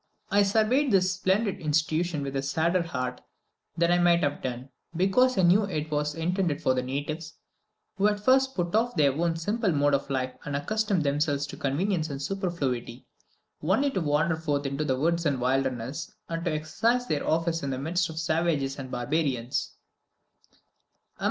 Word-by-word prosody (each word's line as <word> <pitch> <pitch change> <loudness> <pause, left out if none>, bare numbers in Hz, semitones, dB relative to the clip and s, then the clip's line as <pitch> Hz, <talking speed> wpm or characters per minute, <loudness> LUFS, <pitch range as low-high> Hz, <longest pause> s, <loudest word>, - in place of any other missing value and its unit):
I 205 +1 +5
surveyed 225 +7 +2
this 185 -2 +3
splendid 190 +2 0
institution 155 +1 0
with 135 0 -4
a 135 - 0
sadder 160 +6 +1
heart 125 -6 -4 0.6
than 170 +1 +3
I 175 - +4
might 175 -1 +4
have 145 0 -1
done, 125 +1 -5 0.3
because 195 +8 +3
I 190 - +3
knew 190 +5 +5
it 155 -5 -4
was 150 0 -1
intended 170 -1 0
for 130 - +2
the 130 - 0
natives, 150 +5 -4 0.6
who 200 +2 +4
had 210 0 0
first 265 +4 +3
to 180 - +1
put 170 - -6
off 235 +3 +1
their 140 -3 +3
own 165 +3 0
simple 205 +5 0
mode 145 -1 +2
of 140 - 0
life 130 -1 -1
and 145 - -4
accustom 205 +5 0
themselves 145 0 0
to 140 - -8
convenience 160 +4 -1
and 140 -1 -5
superfluity, 140 - -3 0.6
only 220 - +2
to 190 - -1
wander 155 +1 +1
forth 145 -3 -1
into 140 +2 -1
the 130 -4 0
woods 170 +4 +1
and 140 -5 0
wildernesses, 130 0 -1
and 165 +1 -3
exercise 195 +11 0
their 150 -10 -2
office 165 +1 +1
in 140 - -3
the 130 - -2
midst 170 +6 -1
of 160 - -8
savages 160 -4 0
and 130 -1 -6
barbarians. 125 -1 -1
160 Hz, 175 wpm, -27 LUFS, 140-185 Hz, 0.6 s, I